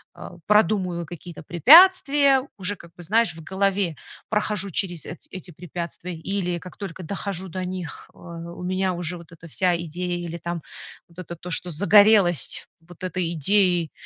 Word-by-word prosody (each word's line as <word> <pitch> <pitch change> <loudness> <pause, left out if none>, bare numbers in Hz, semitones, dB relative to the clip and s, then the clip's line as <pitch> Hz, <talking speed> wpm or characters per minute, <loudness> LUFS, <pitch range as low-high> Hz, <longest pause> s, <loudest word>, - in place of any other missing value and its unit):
э, - - -9 0.2
продумываю 185 -4 +2
какие-то 170 0 -10
препятствия, 280 - +6
уже, 195 +2 -2
как 170 -3 -16
бы, 175 - -10
знаешь, 215 +1 +2
в 165 - -10
голове 195 -1 0 0.3
прохожу 210 -2 0
через 175 -2 -2
эт 175 - -8
эти 185 -1 -7
препятствия 175 +1 -7
или 180 +1 -2
как 180 +1 -12
только 185 -3 -7
дохожу 190 +1 -4
до 185 +1 -5
них, 180 -3 -6
э, - - -24
у 170 +1 -9
меня 185 +1 0
уже 175 0 -4
вот 170 -1 -14
эта 165 0 -13
вся 175 +2 +1
идея 175 +2 -4
или 170 -1 -5
там 170 0 -5 0.5
вот 170 +1 -15
это 170 -1 -7
то, 175 +2 -10
что 180 - +1
загорелось 200 0 +4
вот 175 +2 -15
этой 180 -2 -2
идеей, 175 0 +2
180 Hz, 165 wpm, -24 LUFS, 170-195 Hz, 0.5 s, препятствия